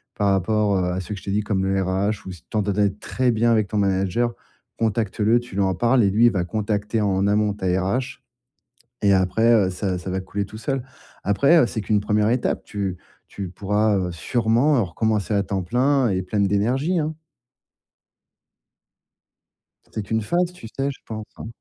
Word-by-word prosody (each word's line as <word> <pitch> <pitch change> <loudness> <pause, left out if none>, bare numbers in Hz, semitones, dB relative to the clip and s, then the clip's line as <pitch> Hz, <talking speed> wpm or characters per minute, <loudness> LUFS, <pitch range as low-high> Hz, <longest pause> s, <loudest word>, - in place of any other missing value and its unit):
par 100 -1 +1
rapport, 100 +1 +1
heu, 90 - +1
à 90 - -2
ceux 95 +3 -5
que 100 - -8
je - - -16
t'ai 100 - -2
dit, 105 +1 +1
comme 100 -2 -1
le 95 0 +1
RH 95 +2 -1
ou - - -5
si 85 - -13
tu - - -51
t'entendais 100 -1 +1
très 125 +5 -1
bien 115 +1 +2
avec 110 -3 +2
ton 105 - -2
manager, 100 +4 +1 0.4
contacte-le, 110 +1 +1
tu 120 -5 -11
lui 100 - +1
en 95 -1 +2
parles 120 +4 +3
et 100 - +3
lui, 110 +4 +4
il - - +4
va 90 -3 0
contacter, 105 +3 -2
en 100 -1 +1
amont, 105 0 +2
ta 100 - -6
RH 95 +9 -1 0.8
et 100 - +5
après 95 +5 +3
heu, 100 -5 +4
ça 90 0 -2
ça 90 +1 -6
va 95 +1 -1
couler 100 +2 -3
tout 110 +2 -10
seul. 135 +2 -2 0.4
Après, 140 +12 +4
heu, 140 - +5
c'est 110 - -4
qu'une 105 +1 +1
1re 105 +1 +1
étape, 125 0 0
tu 100 -3 -3 0.3
tu 100 -2 -6
pourras, 105 +3 +1
heu, 90 -2 -2
sûrement 120 - +2
recommencer 105 +2 -1
à 100 - +2
temps 95 -2 -2
plein 130 +6 +2
et 95 -1 0
pleine 100 +2 0
d'énergie, 125 - +1
hein. 155 +1 -2 2.8
C'est 110 - -3
qu'une 110 +2 -1
phase, 175 +9 0
tu 115 -11 -11
sais, 135 +5 -2
je 135 - -10
pense, 110 -1 -6
hein. - - -7
105 Hz, 195 wpm, -23 LUFS, 95-115 Hz, 2.8 s, et